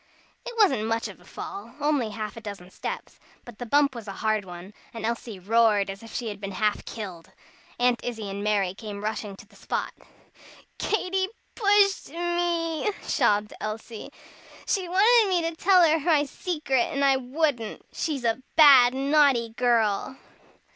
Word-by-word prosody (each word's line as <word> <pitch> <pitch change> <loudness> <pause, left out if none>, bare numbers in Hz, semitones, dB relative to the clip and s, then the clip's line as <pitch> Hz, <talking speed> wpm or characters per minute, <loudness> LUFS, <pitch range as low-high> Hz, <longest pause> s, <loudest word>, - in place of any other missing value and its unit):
It 485 - -6
wasn't 265 - +3
much 225 0 -1
of 200 - -11
a - - -19
fall, 220 +8 -8
only 290 -6 +1
half 215 0 -6
a 230 - -9
dozen 195 -4 -9
steps, - - -6 0.3
but 240 -3 -12
the 245 - -6
bump 285 +2 +3
was 230 -3 -9
a 195 - -5
hard 215 -2 +1
one, 180 +2 -10 0.2
and 225 -1 -4
Elsie 230 -2 -4
roared 210 0 +2
as 195 - -10
if 225 -1 -12
she 235 -3 -3
had 205 -1 -8
been 200 -1 -5
half 210 +1 0
killed. 185 -7 -8 0.5
Aunt 245 0 +1
Izzie 225 -4 -4
and 200 +1 -5
Mary 200 -3 +1
came 205 0 -8
rushing 210 -2 -4
to 200 - -14
the 220 - -23
spot. - - -4 0.9
"Katy 380 -2 0 0.3
pushed 405 -2 +3
me," 345 +1 -1
sobbed 210 0 +1
Elsie. 215 +1 -6 0.6
"She 370 -3 -1
wanted 425 +4 +5
me 350 -3 +1
to 330 - -5
tell 360 0 +5
her 320 +1 +3
my 300 -1 +2
secret, 295 -5 -1
and 280 -2 +1
I 270 -1 +4
wouldn't. 260 -3 -2
She's 295 -6 -3
a 230 +2 0
bad, 265 -5 +8
naughty 275 -4 +3
girl!" 230 0 0
240 Hz, 170 wpm, -26 LUFS, 210-310 Hz, 0.9 s, bad